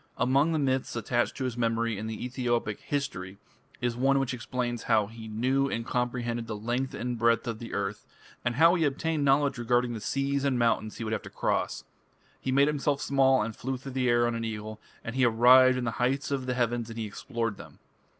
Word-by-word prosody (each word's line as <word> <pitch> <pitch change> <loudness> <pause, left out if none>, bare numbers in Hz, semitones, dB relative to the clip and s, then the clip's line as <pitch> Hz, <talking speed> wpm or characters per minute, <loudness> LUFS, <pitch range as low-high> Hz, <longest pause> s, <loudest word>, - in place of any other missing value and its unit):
Among 140 +6 +3
the 160 - +1
myths 135 -4 0
attached 120 +1 -1
to 135 - -3
his 125 -3 -2
memory 115 -1 0
in 105 +2 -5
the 110 +2 -5
Ethiopic 120 -4 -1
"history" 100 -10 -4 0.4
is 120 -1 0
one 135 +3 +3
which 135 -1 0
explains 120 0 -3
how 110 -2 +4
"he 110 +1 -10
knew 130 +5 +1
and 115 -2 -3
comprehended 120 -1 -2
the 110 - -4
length 120 +5 -2
and 120 +1 -3
breadth 115 0 +3
of 115 -2 -3
the 115 - -6
earth", 100 +1 -3 0.4
and 120 0 0
how 165 +5 +6
he 175 -3 +1
obtained 150 +1 0
knowledge 140 -1 +3
regarding 120 0 +1
the 110 - -6
seas 140 +4 -1
and 135 -3 +1
mountains 115 -2 +1
he - - -4
would 110 0 -2
have 110 - -1
to - - -10
cross. - - -1 0.6
"He 130 - -2
made 140 +2 +4
himself 145 -1 0
small 135 -3 +3
and 110 0 -5
flew 130 +2 -3
through 135 +2 -8
the 130 -1 0
air 120 0 +4
on 120 - 0
an 115 0 -3
eagle, 110 -1 -5 0.2
and 115 - -5
he 130 - +2
arrived 125 +2 +6
in 125 - -2
the 115 - -1
heights 135 +3 0
of 135 -2 -2
the 125 - -1
heavens 120 -1 0
and 115 - -8
he 115 - -2
explored 115 +1 -4
them." - - -12
120 Hz, 220 wpm, -28 LUFS, 115-135 Hz, 0.6 s, how